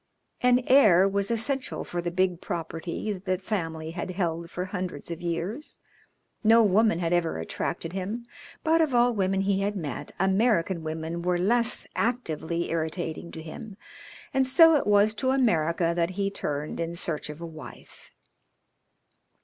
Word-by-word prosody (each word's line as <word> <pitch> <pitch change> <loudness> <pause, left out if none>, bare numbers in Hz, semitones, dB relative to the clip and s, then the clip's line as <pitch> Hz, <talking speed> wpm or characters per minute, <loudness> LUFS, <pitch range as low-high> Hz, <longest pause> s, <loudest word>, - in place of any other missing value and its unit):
An 250 0 +4
heir 205 -9 +6
was 200 0 0
essential 255 +4 0
for 175 - -4
the 175 - -2
big 180 0 0
property 170 +4 -4
that 190 0 -10
the 185 -1 +1
family 165 -5 -4
had 175 +2 -5
held 170 -2 -2
for 180 +2 -4
hundreds 180 -5 -5
of 170 - -6
years. 175 - -3 0.7
No 225 +1 +6
woman 215 -1 +3
had 170 0 -1
ever 175 -2 +1
attracted 120 - -4
him, 205 +5 -4 0.4
but 325 +1 +3
of 295 -6 +1
all 240 0 +4
women 195 -2 0
he 195 0 +1
had 200 +1 -1
met 150 -9 -5
American 190 -2 +2
women 160 +2 -4
were 180 0 +1
less 235 +6 +3
actively 170 -8 -2
irritating 165 0 -3
to 160 - -7
him, 195 +5 -9 0.6
and 265 -1 +2
so 325 +5 +7
it 290 - +1
was 205 +1 +4
to 260 +4 -1
America 170 -10 +2
that 170 0 +1
he 200 0 0
turned 150 -6 -4
in 170 0 -3
search 165 -3 -3
of 150 +1 -8
a 170 - -6
wife. 160 -2 -12
185 Hz, 160 wpm, -27 LUFS, 165-220 Hz, 0.7 s, so